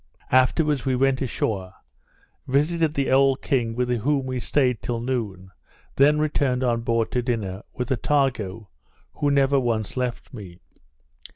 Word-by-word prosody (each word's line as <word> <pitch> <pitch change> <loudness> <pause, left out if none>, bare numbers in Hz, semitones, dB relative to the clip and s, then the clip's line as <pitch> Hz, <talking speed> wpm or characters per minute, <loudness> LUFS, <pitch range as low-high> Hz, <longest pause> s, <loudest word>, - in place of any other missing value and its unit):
Afterwards 135 +2 +3
we 130 -2 0
went 135 +1 +1
ashore; 100 -7 -2 0.7
visited 155 +3 +1
the 140 -1 0
old 135 0 +3
king, 115 -4 0
with 125 0 0
whom 140 +3 0
we 130 -1 -3
staid 125 -3 +1
till 120 -1 -3
noon, 110 -7 -4 0.4
then 145 +2 +5
returned 140 -4 0
on 120 -2 +1
board 115 -1 0
to 125 - 0
dinner, 105 -6 -3
with 125 +1 -3
Attago, 120 -7 -1 0.4
who 145 - 0
never 140 0 +3
once 115 -4 -2
left 125 +1 -4
me. 95 -7 -10
125 Hz, 145 wpm, -24 LUFS, 115-140 Hz, 0.7 s, then